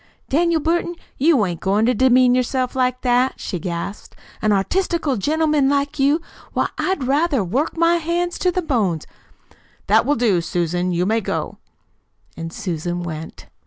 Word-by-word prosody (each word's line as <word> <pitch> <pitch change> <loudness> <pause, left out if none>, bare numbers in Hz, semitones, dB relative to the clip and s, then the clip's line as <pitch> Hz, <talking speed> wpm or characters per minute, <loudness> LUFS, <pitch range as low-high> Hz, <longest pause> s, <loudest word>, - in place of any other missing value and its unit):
"Daniel 335 +3 +2
Burton, 345 +2 0 0.2
you 280 -6 +4
ain't 175 -3 -4
goin' 200 +3 +1
to 250 - +3
demean 255 +1 +4
yourself 255 0 0
like 255 -1 0
that!" 250 +1 +2
she 180 - -4
gasped; 170 +4 -5 0.3
"an 215 - +2
artistical 320 - 0
gentleman 300 +4 +1
like 285 +1 0
you! 285 +4 +3 0.3
Why, - - 0
I'd 375 -7 0
rather 280 -1 +1
work 260 - -1
my 335 +1 +4
hands 345 +2 -2
to 365 - +2
the 365 +1 -2
bones 205 - 0 0.4
" - - -31
"That - - +4
will 290 - +3
do, 215 -7 +2
Susan. 175 +2 -1
You 175 +1 0
may 220 +3 +1
go." - - -4 0.8
And 165 0 -6
Susan 175 0 -3
went. 160 -2 -7
255 Hz, 160 wpm, -20 LUFS, 190-310 Hz, 0.8 s, you